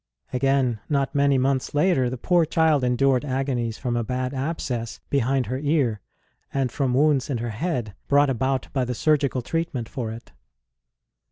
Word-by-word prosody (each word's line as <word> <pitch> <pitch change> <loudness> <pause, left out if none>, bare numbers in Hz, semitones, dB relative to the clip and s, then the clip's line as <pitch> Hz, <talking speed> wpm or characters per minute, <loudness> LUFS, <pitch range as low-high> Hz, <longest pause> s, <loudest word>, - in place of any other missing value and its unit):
Again, 130 -3 +1
not 140 -2 0
many 140 -1 +3
months 130 +1 0
later, 145 -5 +3
the 130 - -4
poor 175 +6 +3
child 160 -3 +2
endured 125 +1 +2
agonies 130 -4 -2
from 125 -3 -2
a 120 - 0
bad 125 +3 -2
abscess 130 -5 -3
behind 135 -1 +1
her 130 +3 -3
ear, 140 -8 +1 0.5
and 135 -3 0
from 130 -2 0
wounds 145 -1 +3
in 135 - -1
her 115 0 -3
head 120 - -2
brought 145 0 +4
about 130 +2 -1
by 135 -3 +1
the 125 0 -3
surgical 140 -3 +1
treatment 160 -6 -2
for 120 -4 -4
it. 115 +1 -10
135 Hz, 165 wpm, -24 LUFS, 125-140 Hz, 0.5 s, brought